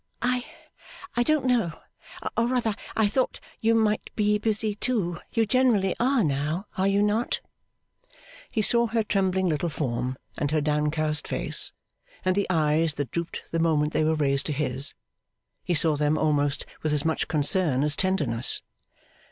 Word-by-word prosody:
'I 250 0 +1 0.7
I 240 - +2
don't 300 +2 +2
know. 235 -10 +2 0.6
Or 230 +1 +2
rather, 245 -3 0 0.2
I 220 -2 +4
thought 255 +5 0 0.2
you 225 0 +3
might 215 -1 +1
be 210 -1 +2
busy 215 0 0
too. 205 -6 -1
You 225 - +2
generally 220 -5 +2
are 255 0 +3
now, 155 +5 -1
are 190 +1 +1
you 200 +1 +3
not?' 215 +3 0 1.1
He 215 - 0
saw 235 +2 +4
her 225 0 0
trembling 190 -2 +1
little 165 +1 0
form 125 -4 -2 0.2
and 145 - 0
her 155 +1 +1
downcast 150 0 0
face, - - 0 0.5
and 185 0 +2
the 200 - +1
eyes 155 -2 +2
that 140 -4 -3
drooped 170 0 -4
the 165 - 0
moment 155 -2 +2
they - - +2
were 160 +1 +2
raised 140 -2 +1
to 150 - -1
his 135 -1 0 0.7
he 175 - 0
saw 155 0 +3
them 150 +1 +1
almost 145 -2 +1 0.2
with 155 -1 0
as 150 0 0
much 160 -1 0
concern 150 -2 +2
as 150 -1 +2
tenderness. 145 -12 +1
170 Hz, 160 wpm, -26 LUFS, 150-215 Hz, 1.1 s, I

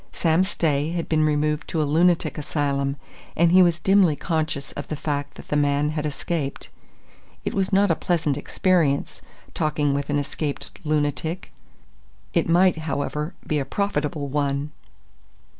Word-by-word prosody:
Sam 165 +2 +2
Stay 155 -6 0
had 170 -1 -2
been 155 -1 +2
removed 150 0 0
to 165 - -2
a - - +3
lunatic 165 +2 +2
asylum, 140 -2 -1 0.4
and 170 +1 +4
he 185 +1 +7
was 170 -2 +4
dimly 190 -2 +4
conscious 155 -4 -2
of 145 - -7
the 155 - -3
fact 145 -1 -3
that - - -12
the - - 0
man 145 0 +2
had 155 0 -2
escaped. 145 -1 -4 0.8
It - - -1
was 195 0 0
not 200 -1 +4
a - - +3
pleasant 160 -5 0
experience, 150 -1 0 0.3
talking 150 -2 0
with 140 +1 -2
an 145 - +1
escaped 145 0 -3
lunatic. 155 +3 -1 0.8
It 170 -2 +1
might, 180 +1 +4
however, 150 +1 -3
be 150 - 0
a - - 0
profitable 150 -2 -2
one. 140 +1 -1
150 Hz, 155 wpm, -24 LUFS, 145-170 Hz, 0.8 s, he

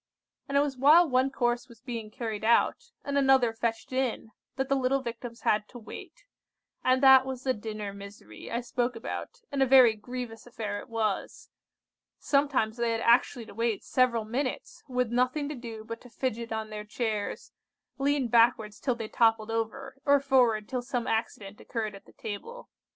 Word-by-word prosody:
And 280 - +1
it - - +6
was 285 -2 -2
while 315 +6 +7
one 260 0 +2
course 240 -2 -1
was 235 -2 -15
being 235 -3 -6
carried 220 -2 -5
out, 235 - +2 0.2
and 280 0 +1
another 265 -4 +4
fetched 225 +2 -3
in, 255 -4 -1 0.2
that 265 0 -1
the 275 - +2
little 265 0 +1
Victims 235 0 -7
had 210 0 +1
to 245 - -10
wait; 235 - -11 0.6
and 255 +1 +3
that 265 -1 +9
was 260 -1 -6
the 260 - +1
dinner 210 -2 -6
misery 200 - -11
I 235 - -2
spoke 245 0 -1
about, 235 - -6
and 280 -1 -1
a - - +6
very 255 -3 +7
grievous 235 +1 -7
affair 210 -4 -4
it - - -12
was. 220 -3 -3 0.7
Sometimes 275 -6 +1
they 235 -1 +1
had 225 - -2
actually 235 0 +3
to - - -12
wait 230 0 -1
several 235 -4 +2
minutes, 260 - -3
with 250 -3 -1
nothing 255 +4 +1
to 300 - -4
do 230 -3 -8
but 230 +1 -7
to 250 - -14
fidget 235 -2 -3
on 220 -1 -3
their 210 0 -5
chairs, 215 -1 -3 0.5
lean 280 -1 +1
backwards 230 -2 +3
till 255 -3 0
they 225 -2 -5
toppled 225 -1 +2
over, 265 +4 -4
or 285 0 +5
forward 245 -6 +2
till 255 -2 -2
some 245 -1 -3
accident 215 -3 -3
occurred 220 -3 -4
at 195 - -13
the - - -19
table. 465 - -8
240 Hz, 185 wpm, -28 LUFS, 220-265 Hz, 0.7 s, that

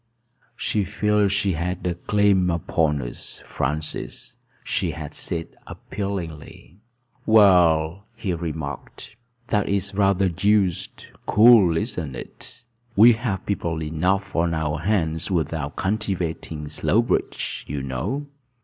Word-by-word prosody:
"She 105 -3 -1
feels 105 +1 +1
she 100 -1 +1
has 85 +3 -2
a 90 - +1
claim 100 0 +2
upon 80 -4 0
us, - - -9
Francis," 75 +3 -4 0.3
she - - -1
had - - -7
said 85 -1 -3 0.2
appealingly. 90 -3 -6 0.5
"Well," 90 -4 +4
he 110 -5 -3
had 85 -1 -4
remarked, 80 +3 -6 0.3
"that 105 -2 +1
is 100 0 0
rather 100 -1 +2
deuced 95 +1 0 0.2
cool, 105 -7 +6
isn't 80 - -3
it? 120 - -11 0.3
We 115 +4 +8
have 110 -5 -3
people 85 -5 -2
enough 90 +5 -1
on 85 0 +1
our 75 -1 -1
hands 80 -3 0
without 80 -4 -2
cultivating 90 -7 -2
Slowbridge, 75 - 0
you 70 -1 -4
know." 70 - -3
90 Hz, 115 wpm, -23 LUFS, 80-100 Hz, 0.5 s, We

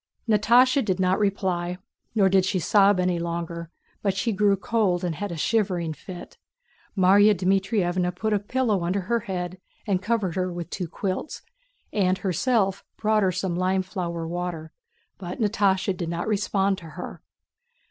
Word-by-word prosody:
Natásha 240 +5 +4
did 190 -4 -1
not 185 0 +2
reply, 185 -3 -1 0.4
nor 200 -3 +5
did 190 0 +4
she 190 +1 0
sob 200 +1 +4
any 180 -1 +1
longer, 170 -1 -4 0.3
but 195 -2 0
she 225 +4 0
grew 205 -1 +3
cold 195 -3 0
and 175 -2 -1
had 205 +5 -4
a 170 - -5
shivering 180 -4 0
fit. 180 +3 -10 0.6
Márya 200 +3 +6
Dmítrievna 185 -1 +1
put 215 +3 -1
a 205 - +2
pillow 215 -3 0
under 185 +3 0
her 235 +6 0
head, 185 -4 -5 0.4
covered 205 -4 0
her 185 -1 -1
with 175 -1 -6
two 180 -2 -3
quilts, 190 - -4 0.5
and 185 -2 +2
herself 195 +2 0
brought 215 0 +2
her 190 -2 +2
some 180 0 -2
lime 185 +1 +1
flower 170 -3 -4
water, 170 -2 -4 0.5
but 180 -1 -6
Natásha 200 -3 +1
did 170 -2 -4
not 170 +3 -3
respond 200 -2 +1
to 170 - -13
her. - - -7
190 Hz, 160 wpm, -25 LUFS, 180-205 Hz, 0.6 s, Márya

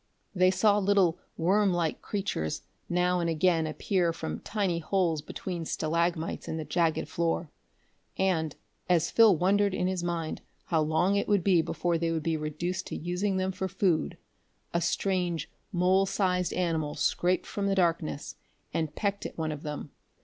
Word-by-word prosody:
They 185 -1 +4
saw 205 +3 +3
little 195 -4 +3 0.2
worm 195 +4 +3
like 170 -3 -1
creatures 190 - -3 0.3
now 180 +1 +2
and 170 -1 0
again 165 0 +2
appear 175 +2 0
from 80 - -5
tiny 195 -6 -1
holes 170 -2 0
between 170 +2 -5
stalagmites 165 +1 -1
in 160 - -3
the 160 - -4
jagged 160 +2 +1
floor; 165 -1 -1 0.7
and, 165 -5 +1 0.3
as 175 -2 +3
Phil 220 -6 +6
wondered 200 +3 +2
in 180 - 0
his 185 -1 -1
mind 170 -2 -3 0.2
how 160 -3 +1
long 160 +6 +2
it 200 - 0
would 205 -4 +2
be 180 -4 +4
before 165 +1 -1
they 165 0 0
would 160 -2 -1
be 165 0 0
reduced 160 +4 -3
to - - -5
using 180 +3 -1
them 185 0 0
for 190 0 -3
food, 185 -3 0 0.6
a 170 - +1
strange 175 -1 -1 0.2
mole 190 +1 +3
sized 180 -3 +1
animal 160 -4 -1
scraped 180 +1 +1
from 200 -1 -2
the 195 - +2
darkness 165 - 0 0.4
and 155 -2 -2
pecked 200 -1 -1
at - - -14
one 160 -1 -1
of 150 -1 -6
them. 150 -1 -6
175 Hz, 165 wpm, -29 LUFS, 160-190 Hz, 0.7 s, Phil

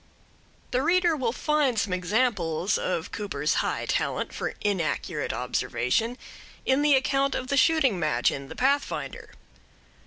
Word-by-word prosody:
The 250 - +1
reader 345 +2 +3
will 255 -6 0
find 290 -2 +1
some 205 -2 0
examples 185 -3 0
of 175 -3 -2
Cooper's 150 -8 -1
high - - -2
talent - - -1
for - - -4
inaccurate 190 -7 -1
observation 125 - -1 0.5
in 265 +2 +3
the 295 -1 +5
account 275 +1 +1
of 255 0 -4
the 280 - +1
shooting 275 - +3
match 150 -7 +2
in 135 0 -6
The - - -9
Pathfinder. 280 +3 -1
230 Hz, 135 wpm, -26 LUFS, 175-275 Hz, 0.5 s, the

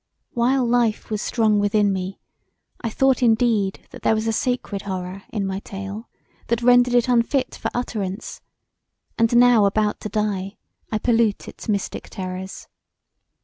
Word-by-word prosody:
While 250 +2 +2
life 235 -2 +1
was 215 -1 -1
strong 215 -3 +2
within 205 0 +2
me 190 0 -4 0.7
I 230 - 0
thought 265 +4 +2
indeed 225 -4 +2
that - - -11
there 220 - +3
was 220 0 -2
a 225 - 0
sacred 245 -4 -2
horror 190 -1 -5
in 205 -3 -2
my 190 0 -2
tale 200 +3 -7 0.4
that 235 0 0
rendered 245 0 +5
it 245 +1 +3
unfit 250 +2 +1
for - - -3
utterance, 210 -4 -4 0.8
and 230 +1 +3
now 240 -3 +6
about 210 +1 0
to 215 - -5
die 205 -1 -2 0.3
I 215 - +1
pollute 225 -2 +1
its - - -9
mystic 200 -2 -2
terrors. 185 0 -6
215 Hz, 150 wpm, -22 LUFS, 200-240 Hz, 0.8 s, now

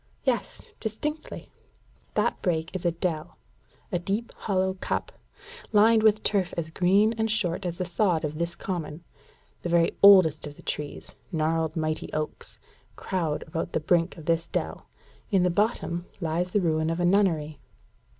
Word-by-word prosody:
"Yes, - - -1
distinctly." 300 +8 -5 0.6
"That - - +1
break 165 -1 -1
is 185 - -4
a - - +3
dell 165 -2 -3 0.5
a 175 - 0
deep 200 +6 -3
hollow 190 -2 0
cup, 185 - -3 0.6
lined 220 +1 +5
with 215 -1 +4
turf 190 -4 +1
as 160 -1 -3
green 195 +6 +3
and 220 0 +1
short 185 -4 0
as 170 -1 -4
the 185 - -2
sod 175 -2 +1
of 155 +1 -5
this 170 0 -2
Common: 170 -3 -5 0.6
the 175 - -3
very 170 -1 +3
oldest 185 -7 +7
of 145 - -10
the - - -15
trees, 150 -1 -5 0.2
gnarled 160 -1 0
mighty 155 -1 -2
oaks, 155 0 -4 0.4
crowd 165 -5 -2
about 160 +1 -4
the - - +2
brink 170 +3 +1
of 160 - -10
this 165 0 +1
dell; - - -4 0.4
in 195 -4 +3
the 180 - +3
bottom 175 -3 0
lie 165 0 0
the 190 +3 0
ruins 160 -2 +1
of 165 +1 -2
a 175 - +2
nunnery. 165 -6 +2
175 Hz, 160 wpm, -27 LUFS, 160-195 Hz, 0.6 s, oldest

